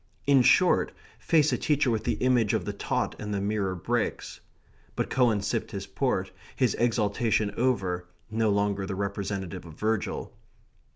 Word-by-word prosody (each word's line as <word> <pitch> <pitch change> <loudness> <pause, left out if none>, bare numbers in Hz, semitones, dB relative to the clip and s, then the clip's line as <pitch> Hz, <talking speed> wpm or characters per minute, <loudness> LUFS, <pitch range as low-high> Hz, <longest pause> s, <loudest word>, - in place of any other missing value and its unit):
In 140 -2 +5
short, 180 +8 +4 0.3
face 155 -3 +3
a - - 0
teacher 145 -4 +2
with 110 -2 -1
the - - +1
image 125 -5 +3
of - - -2
the - - -3
taught - - -2
and 105 0 -4
the 100 - -1
mirror 100 -2 -1
breaks. 85 - -2 0.6
But - - -2
Cowan 120 -5 +3
sipped 100 - -2
his 100 -1 -5
port, 95 -1 -1 0.2
his 125 -2 +2
exaltation 110 -2 +1
over, 95 -8 0 0.2
no 110 0 +1
longer 100 -1 0
the 100 - -3
representative 100 -2 -3
of 80 -2 -12
Virgil. 110 -2 -2
105 Hz, 160 wpm, -27 LUFS, 100-120 Hz, 0.6 s, In